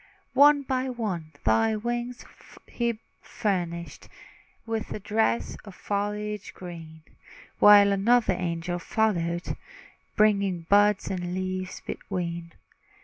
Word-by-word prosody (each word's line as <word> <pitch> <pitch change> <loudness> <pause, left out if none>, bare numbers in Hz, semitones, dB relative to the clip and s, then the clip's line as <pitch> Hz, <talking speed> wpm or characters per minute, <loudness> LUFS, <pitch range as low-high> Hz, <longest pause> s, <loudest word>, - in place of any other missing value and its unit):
One 285 +1 +6
by 260 0 -1
one 195 -10 -4
thy 225 -1 +3
twigs 240 +2 -4 0.4
he 235 -2 -2 0.2
furnished 175 -6 -3 0.6
With 225 -1 -3
a - - -4
dress 205 - 0
of 200 -3 -12
foliage 210 0 -3
green; 165 -3 -10 0.6
While 205 -1 +8
another 205 +1 +3
angel 175 0 -3
followed, 175 -4 -1 0.6
Bringing 200 -4 +2
buds 205 +3 +3
the 190 - -3
leaves 185 +1 -4
between. 170 -3 -5
200 Hz, 100 wpm, -26 LUFS, 175-220 Hz, 0.6 s, While